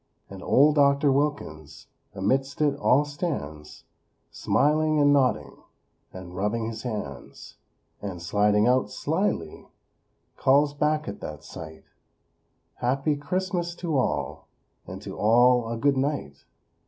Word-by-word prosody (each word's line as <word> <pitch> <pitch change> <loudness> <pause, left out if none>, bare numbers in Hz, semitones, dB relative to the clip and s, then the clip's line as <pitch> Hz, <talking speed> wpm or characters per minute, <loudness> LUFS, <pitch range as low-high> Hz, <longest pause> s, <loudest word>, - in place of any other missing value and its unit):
And 95 -1 -9
Old 150 +3 +4
Doctor 140 0 +4
Wilkins 80 - -3 0.3
Amidst 130 +8 -1
it 145 -2 +2
all 145 +1 +3
stands; 80 - -6 0.5
Smiling 155 +1 +1
and 145 0 +5
nodding, 135 -3 0 0.5
And 90 -1 -10
rubbing 105 +4 -1
his 110 0 -5
hands; 105 - -7 0.4
And, 95 -4 -6
sliding 105 +4 +2
out, 125 +1 +2
slyly; - - -2 0.7
Calls 145 +2 +3
back 150 +1 0
at 100 - -6
that - - -7
sight: 80 -1 -10 0.9
"Happy 135 +4 0
Christmas 175 +2 -3
to 170 -3 -3
all; 130 - -2 0.4
And - - -8
to - - -7
all 120 +2 +4
a 115 - -3
Good 140 +3 +2
Night!" 130 - -3
130 Hz, 120 wpm, -25 LUFS, 105-145 Hz, 0.9 s, and